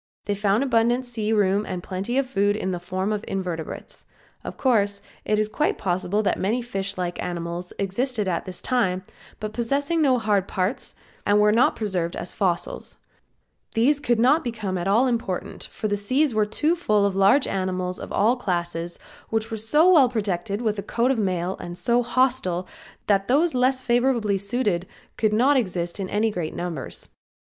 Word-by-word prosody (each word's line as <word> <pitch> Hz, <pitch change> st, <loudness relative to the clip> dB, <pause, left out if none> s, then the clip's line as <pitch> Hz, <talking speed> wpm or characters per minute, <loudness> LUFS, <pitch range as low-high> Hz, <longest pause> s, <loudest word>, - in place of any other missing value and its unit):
They 205 Hz, -, 0 dB
found 205 Hz, +4 st, +1 dB
abundant 240 Hz, 0 st, +2 dB
sea 225 Hz, -3 st, -3 dB
room 205 Hz, -1 st, +2 dB
and 180 Hz, -4 st, -5 dB
plenty 195 Hz, +7 st, -3 dB
of 275 Hz, -, +2 dB
food 205 Hz, -4 st, +1 dB
in 190 Hz, -3 st, -2 dB
the 180 Hz, -, -3 dB
form 185 Hz, +4 st, -2 dB
of 210 Hz, 0 st, -3 dB
invertebrates. 180 Hz, -4 st, -5 dB, 0.4 s
Of -, -, -7 dB
course 205 Hz, -6 st, +2 dB, 0.3 s
it 210 Hz, -, +1 dB
is 215 Hz, 0 st, +1 dB
quite 300 Hz, +8 st, 0 dB
probable 190 Hz, +2 st, 0 dB
that -, -, 0 dB
many 225 Hz, +6 st, 0 dB
fish 200 Hz, -4 st, -3 dB
like 175 Hz, -1 st, -3 dB
animals 175 Hz, 0 st, -4 dB
existed 210 Hz, +2 st, -1 dB
at 170 Hz, -2 st, -1 dB
this 185 Hz, -1 st, -7 dB
time, 190 Hz, -8 st, +1 dB, 0.4 s
but 215 Hz, 0 st, -5 dB
possessing 280 Hz, +8 st, 0 dB
no 265 Hz, -4 st, +4 dB
hard 205 Hz, -4 st, +1 dB
parts 190 Hz, +5 st, -2 dB, 0.3 s
and 205 Hz, 0 st, +3 dB
were 210 Hz, 0 st, +5 dB
not 230 Hz, +4 st, +4 dB
preserved 185 Hz, -6 st, -2 dB
as 175 Hz, -, -5 dB
fossils; 180 Hz, -4 st, -2 dB, 0.8 s
these 265 Hz, +6 st, +3 dB
could 240 Hz, -5 st, +1 dB
not 290 Hz, +7 st, +4 dB
become 220 Hz, -6 st, -3 dB
at 175 Hz, 0 st, -2 dB
all 220 Hz, +6 st, +4 dB
important 230 Hz, -7 st, -2 dB
for 215 Hz, -, -4 dB
the 205 Hz, -, 0 dB
sea 255 Hz, +7 st, +1 dB
was 215 Hz, -1 st, +2 dB
too 305 Hz, +10 st, +1 dB
full 215 Hz, -12 st, +2 dB
of 200 Hz, -1 st, 0 dB
large 195 Hz, +8 st, +5 dB
animals 185 Hz, -1 st, -2 dB
of -, -, -8 dB
all 225 Hz, +5 st, +3 dB
classes 175 Hz, -6 st, -3 dB, 0.3 s
which 225 Hz, 0 st, -2 dB
were -, -, -1 dB
so 260 Hz, +10 st, +3 dB
well 305 Hz, -9 st, +6 dB
protected 200 Hz, -2 st, -2 dB
with 215 Hz, -2 st, 0 dB
a -, -, -1 dB
coat 235 Hz, +5 st, +1 dB
of 255 Hz, -, 0 dB
mail 185 Hz, -2 st, -1 dB
and 175 Hz, 0 st, -7 dB
so 240 Hz, +4 st, +2 dB
hostile 240 Hz, -8 st, +1 dB, 0.4 s
that 195 Hz, -1 st, +2 dB
those 310 Hz, +6 st, +3 dB
less 255 Hz, +1 st, +2 dB
favorably 240 Hz, -5 st, +1 dB
situated 200 Hz, -4 st, -1 dB, 0.3 s
could 215 Hz, -1 st, +1 dB
not 260 Hz, +6 st, +4 dB
exist 180 Hz, -6 st, -2 dB
in 190 Hz, -1 st, -3 dB
any 215 Hz, +2 st, +1 dB
great 175 Hz, -5 st, -4 dB
numbers. 165 Hz, -7 st, -5 dB
210 Hz, 185 wpm, -24 LUFS, 185-245 Hz, 0.8 s, well